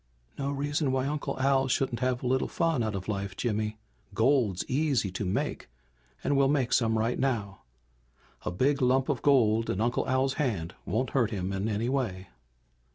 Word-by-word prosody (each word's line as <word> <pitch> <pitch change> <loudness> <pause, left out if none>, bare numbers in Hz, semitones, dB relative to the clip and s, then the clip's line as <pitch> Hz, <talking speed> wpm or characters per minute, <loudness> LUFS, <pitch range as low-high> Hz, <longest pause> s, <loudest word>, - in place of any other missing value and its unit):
"No 140 0 -2
reason 145 0 -1
why 130 0 0
Uncle 145 -1 -3
Al 135 0 +3
shouldn't 130 -2 0
have 130 0 0
a - - -1
little 130 +1 +1
fun 165 -6 0
out 110 -2 -1
of 95 -1 -5
life, 100 -2 -3
Jimmy. 110 -2 -1 0.4
Gold's 115 -5 +2
easy 135 -8 +1
to 90 - -4
make 90 - -2 0.5
and 145 - +1
we'll 135 0 +4
make 135 -3 +1
some 115 -2 +3
right 115 +2 0
now. 110 -7 -1 0.8
A - - -2
big 135 +10 +1
lump 130 +2 +2
of 135 -5 0
gold 115 -5 +3
in 95 - -1
Uncle 120 +3 0
Al's 130 +1 +2
hand 95 - -1
won't 115 +7 -1
hurt 120 -5 +2
him 95 -3 -3
in 95 +3 -1
any 110 +2 -1
way." 110 -9 -2
125 Hz, 180 wpm, -28 LUFS, 105-135 Hz, 0.8 s, we'll